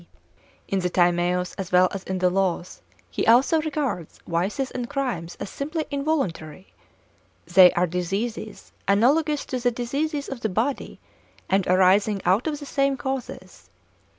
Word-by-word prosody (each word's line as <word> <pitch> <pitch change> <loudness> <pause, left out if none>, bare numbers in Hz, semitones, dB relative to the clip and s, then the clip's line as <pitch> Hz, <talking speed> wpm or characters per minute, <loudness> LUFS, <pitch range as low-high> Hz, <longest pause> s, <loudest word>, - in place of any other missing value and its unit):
In 195 - 0
the 180 -1 -1
Timaeus, 175 0 +1
as 190 -2 -5
well 180 0 +5
as 195 - -5
in 190 - -3
the 180 0 +2
Laws, 185 -2 -1 0.3
he - - -2
also 260 +7 +5
regards 280 - -3
vices 195 +11 -1
and 245 -1 -5
crimes 210 -12 -3
as - - -6
simply 310 +3 -3
involuntary; 235 - -3 0.7
they 180 0 +7
are 175 - +2
diseases 195 +6 -4 0.2
analogous 285 +9 +2
to 255 - -3
the 245 0 +2
diseases 280 +5 -3
of 270 -3 -6
the 220 - -1
body, 230 +9 -2 0.5
and 195 -1 +2
arising 190 +3 +3
out 190 - +2
of 295 -2 -2
the 290 - -8
same 275 -1 0
causes. 265 0 -6
215 Hz, 150 wpm, -24 LUFS, 180-275 Hz, 0.7 s, they